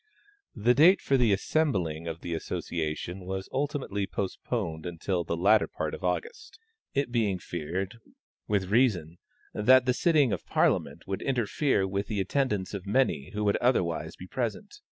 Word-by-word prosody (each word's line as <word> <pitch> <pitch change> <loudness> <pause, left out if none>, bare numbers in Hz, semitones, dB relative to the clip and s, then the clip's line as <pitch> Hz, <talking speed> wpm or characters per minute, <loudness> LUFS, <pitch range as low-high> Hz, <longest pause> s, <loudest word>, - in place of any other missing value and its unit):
The 120 +3 +3
date 165 +8 +6
for 140 - +1
the 120 -5 +4
assembling 95 - 0
of 80 0 -5
the 85 - -4
Association 80 +2 -3
was 95 +1 -5
ultimately 135 -8 -2
postponed 95 -4 -3
until 85 +1 -2
the 85 0 -3
latter 105 +5 +4
part - - -4
of - - -7
August, 450 -1 -3 0.4
it 140 -3 0
being 110 -6 +1
feared, 90 +6 -4 0.5
with 100 -2 0
reason, 95 -9 +2 0.3
that 125 +4 +5
the 125 - +3
sitting 145 -4 +3
of - - -3
Parliament - - +1
would 95 - -3
interfere 125 -4 +1
with 100 +1 -2
the 105 - -2
attendance 105 -2 0
of 100 -1 -6
many 105 - +1
who 105 0 -2
would 100 -1 +2
otherwise 85 -10 0
be 90 - -10
present. 125 - -4
100 Hz, 155 wpm, -28 LUFS, 90-130 Hz, 0.5 s, date